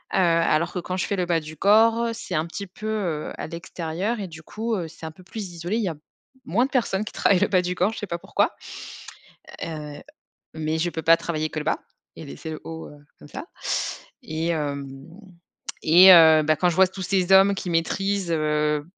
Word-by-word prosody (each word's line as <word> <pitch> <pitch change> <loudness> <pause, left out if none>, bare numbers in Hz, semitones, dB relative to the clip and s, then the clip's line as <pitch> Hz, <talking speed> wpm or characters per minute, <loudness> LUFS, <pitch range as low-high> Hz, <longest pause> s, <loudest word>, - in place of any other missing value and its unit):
Heu, - - +2
alors 170 -1 +2
que 180 - -2
quand 185 +1 -4
je - - -1
fais 200 - -2
le 180 -1 -1
bas 170 -2 +2
du 155 0 -10
corps, 225 +4 +4
c'est 190 - -7
un 155 +1 0
petit 200 +4 -6
peu, 215 +4 -8
heu, 180 -8 -2
à - - -5
l'extérieur 170 +6 -4
et 195 - -4
du 160 -1 -11
coup, 225 +4 -3
heu, 170 -4 -3
c'est 160 0 -11
un 160 - -5
peu 170 - -18
plus 195 0 -7
isolé. 175 +6 -3
Il 230 - 0
y - - 0
a 160 - -5 0.5
moins 235 +10 +2
de - - -7
personnes 220 -6 0
qui - - -7
travaillent 190 -3 +3
le - - +2
bas 185 -2 +3
du 180 0 -3
corps, 185 +5 +1
je - - -7
sais 205 - -5
pas 170 - -3
pourquoi. - - 0 1.1
Heu, 150 -2 -7 0.5
mais 160 0 -2
je 175 +2 0
peux 160 - -5
pas 165 0 +6
travailler 155 -2 -3
que 155 - -4
le - - -5
bas - - 0 0.4
et - - -9
laisser 75 - -8
le 155 - -6
haut, 160 0 -7
heu, 145 - -13 0.2
comme 145 - -13
ça. - - -7 0.8
Et 160 -6 -3
hem, 145 -4 -2 1.0
et 180 +4 +8
heu, 160 -2 +7
bah, 155 +1 +2
quand 180 - +2
je 170 - -2
vois 190 0 +6
tous 190 +1 -9
ces 190 0 0
hommes 195 +1 +7
qui 180 - -5
maîtrisent, 190 +2 0
heu 150 -1 0
170 Hz, 225 wpm, -24 LUFS, 160-195 Hz, 1.1 s, et